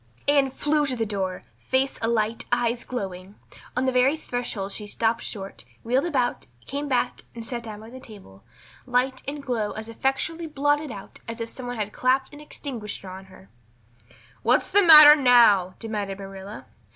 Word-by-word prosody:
Anne 285 Hz, -2 st, +4 dB
flew 295 Hz, +3 st, 0 dB
to 260 Hz, -, -1 dB
the 230 Hz, -2 st, -1 dB
door, 190 Hz, -3 st, -3 dB, 0.2 s
face 265 Hz, +1 st, 0 dB
alight, 225 Hz, 0 st, 0 dB
eyes 240 Hz, -1 st, 0 dB
glowing. 195 Hz, -5 st, -6 dB, 0.4 s
On 255 Hz, -, +1 dB
the 260 Hz, -, +2 dB
very 255 Hz, +4 st, +3 dB
threshold 240 Hz, -8 st, -4 dB
she 210 Hz, +1 st, -7 dB
stopped 225 Hz, +2 st, 0 dB
short, 195 Hz, -3 st, -7 dB, 0.2 s
wheeled 255 Hz, +6 st, +1 dB
about, 260 Hz, -8 st, -1 dB, 0.2 s
came 285 Hz, +1 st, -4 dB
back 250 Hz, -1 st, -1 dB
and 230 Hz, -1 st, -7 dB
sat 240 Hz, 0 st, -4 dB
down 215 Hz, -2 st, -9 dB
by 220 Hz, +1 st, -12 dB
the 260 Hz, -, -10 dB
table, 195 Hz, -, -14 dB, 0.4 s
light 255 Hz, +1 st, 0 dB
and 285 Hz, 0 st, -5 dB
glow 235 Hz, -6 st, -2 dB
as 220 Hz, 0 st, -7 dB
effectually 270 Hz, +8 st, -2 dB
blotted 290 Hz, -1 st, 0 dB
out 195 Hz, -3 st, -10 dB
as 230 Hz, +1 st, -6 dB
if 230 Hz, 0 st, -4 dB
some 255 Hz, +1 st, -7 dB
one 245 Hz, -, -4 dB
had 210 Hz, -1 st, -4 dB
clapped 260 Hz, +2 st, +1 dB
an 290 Hz, -, -11 dB
extinguisher 240 Hz, -9 st, -7 dB
on 190 Hz, +1 st, -9 dB
her. 185 Hz, -, -17 dB, 0.9 s
"What's 245 Hz, +5 st, +2 dB
the 405 Hz, -, +6 dB
matter 305 Hz, -4 st, +10 dB
now?" 235 Hz, -9 st, +5 dB
demanded 205 Hz, -4 st, -4 dB
Marilla. 195 Hz, +1 st, -9 dB
240 Hz, 175 wpm, -24 LUFS, 210-270 Hz, 0.9 s, matter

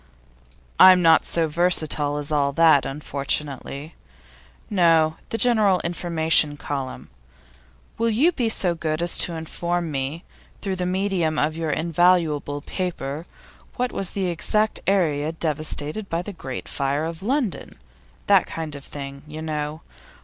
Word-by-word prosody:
'I'm 185 Hz, -1 st, +8 dB
not 165 Hz, -1 st, +5 dB
so 165 Hz, -1 st, 0 dB
versatile 155 Hz, -3 st, +2 dB
as 145 Hz, +1 st, -5 dB
all 140 Hz, -2 st, +2 dB
that, 160 Hz, -3 st, +5 dB
unfortunately. 140 Hz, +1 st, -4 dB, 0.7 s
No, 165 Hz, -6 st, +3 dB
the 225 Hz, -, -2 dB
general 215 Hz, -6 st, +4 dB
information 160 Hz, -3 st, +2 dB
column. 135 Hz, -, -5 dB, 0.9 s
"Will 230 Hz, 0 st, +2 dB
you 265 Hz, +11 st, +3 dB
be 245 Hz, -9 st, -1 dB
so 185 Hz, -5 st, +2 dB
good 160 Hz, 0 st, -2 dB
as 175 Hz, -, +1 dB
to 170 Hz, -, +1 dB
inform 170 Hz, +1 st, -3 dB
me, 140 Hz, +4 st, -3 dB, 0.4 s
through 195 Hz, -2 st, -3 dB
the 180 Hz, 0 st, -2 dB
medium 185 Hz, -4 st, 0 dB
of 155 Hz, +2 st, 0 dB
your 165 Hz, -1 st, -3 dB
invaluable 160 Hz, -3 st, +1 dB
paper, 165 Hz, -3 st, -4 dB, 0.5 s
what 250 Hz, 0 st, -1 dB
was 195 Hz, -2 st, -2 dB
the 195 Hz, -, 0 dB
exact 210 Hz, +5 st, +1 dB
area 160 Hz, -6 st, +1 dB
devastated 155 Hz, +4 st, -3 dB
by 165 Hz, +1 st, -2 dB
the 205 Hz, -, -7 dB
Great 135 Hz, -7 st, -7 dB
Fire 140 Hz, +2 st, -1 dB
of 165 Hz, +1 st, -6 dB
London?" 245 Hz, -1 st, -2 dB, 0.5 s
that -, -, +4 dB
kind 160 Hz, -2 st, -6 dB
of 140 Hz, -1 st, -8 dB
thing, 140 Hz, -1 st, -8 dB
you 155 Hz, +1 st, -7 dB
know. 150 Hz, 0 st, -4 dB
160 Hz, 140 wpm, -23 LUFS, 150-180 Hz, 0.9 s, I'm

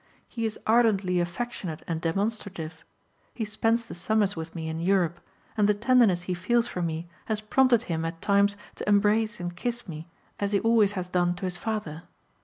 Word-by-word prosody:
He 230 Hz, -2 st, -2 dB
is 215 Hz, -, -4 dB
ardently 210 Hz, -6 st, +3 dB
affectionate 175 Hz, -2 st, -3 dB
and 165 Hz, -1 st, -2 dB
demonstrative. 175 Hz, -3 st, -2 dB, 0.5 s
He 225 Hz, -, -2 dB
spends 225 Hz, +2 st, +1 dB
the -, -, -9 dB
summers 205 Hz, +3 st, +1 dB
with 165 Hz, +1 st, -7 dB
me 160 Hz, -1 st, -4 dB
in 160 Hz, 0 st, -3 dB
Europe, 175 Hz, -2 st, +1 dB, 0.4 s
and 210 Hz, -2 st, +3 dB
the 210 Hz, -, +4 dB
tenderness 225 Hz, -5 st, +4 dB
he 180 Hz, -, -2 dB
feels 230 Hz, +7 st, +1 dB
for 180 Hz, -, -4 dB
me 165 Hz, 0 st, -3 dB, 0.2 s
has 220 Hz, -1 st, -1 dB
prompted 240 Hz, +2 st, +3 dB
him 165 Hz, -5 st, -2 dB
at 165 Hz, 0 st, -4 dB
times 200 Hz, +1 st, +3 dB, 0.2 s
to -, -, -3 dB
embrace 210 Hz, +1 st, +3 dB
and 175 Hz, 0 st, -4 dB
kiss 240 Hz, +5 st, -3 dB
me 160 Hz, -1 st, -7 dB, 0.3 s
as 200 Hz, 0 st, -1 dB
he 200 Hz, -, +4 dB
always 225 Hz, -3 st, +4 dB
has 185 Hz, -2 st, -3 dB
done 175 Hz, -1 st, +1 dB
to 180 Hz, -, -5 dB
his 180 Hz, -1 st, -2 dB
father. 210 Hz, -8 st, -4 dB
200 Hz, 190 wpm, -27 LUFS, 175-220 Hz, 0.5 s, the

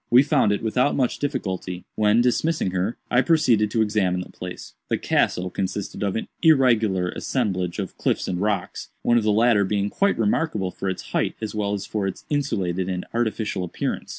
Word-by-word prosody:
We 125 Hz, +3 st, +7 dB
found 140 Hz, -7 st, +3 dB
it 105 Hz, -, -1 dB
without 125 Hz, +5 st, +1 dB
much 130 Hz, -3 st, 0 dB
difficulty, 95 Hz, -, -3 dB
when, 105 Hz, +2 st, +3 dB
dismissing 125 Hz, -, +1 dB
her, 95 Hz, +5 st, -1 dB
I 125 Hz, -, +5 dB
proceeded 125 Hz, -10 st, +3 dB
to 110 Hz, 0 st, +2 dB
examine 95 Hz, -4 st, 0 dB
the -, -, -9 dB
place. 90 Hz, -1 st, -8 dB, 0.2 s
The -, -, +1 dB
'castle' 90 Hz, 0 st, 0 dB
consisted 95 Hz, +1 st, -4 dB
of 100 Hz, -2 st, 0 dB
an 110 Hz, -, -3 dB
irregular 115 Hz, -, +4 dB
assemblage 95 Hz, -9 st, -2 dB
of 100 Hz, -3 st, -4 dB
cliffs -, -, 0 dB
and 90 Hz, 0 st, -2 dB
rocks—one 105 Hz, +3 st, -1 dB
of -, -, -3 dB
the 105 Hz, -, +2 dB
latter 110 Hz, -1 st, +4 dB
being 100 Hz, +1 st, -1 dB
quite 200 Hz, 0 st, +1 dB
remarkable 105 Hz, -, 0 dB
for 95 Hz, -, -4 dB
its 95 Hz, -, -6 dB
height -, -, 0 dB
as 110 Hz, -1 st, -4 dB
well 105 Hz, -1 st, -1 dB
as 100 Hz, -, -5 dB
for 105 Hz, -3 st, -2 dB
its 95 Hz, -, -6 dB
insulated 95 Hz, -11 st, -1 dB
and 90 Hz, -1 st, -3 dB
artificial 110 Hz, -4 st, -1 dB
appearance. 85 Hz, -, -3 dB
105 Hz, 185 wpm, -23 LUFS, 95-120 Hz, 0.2 s, We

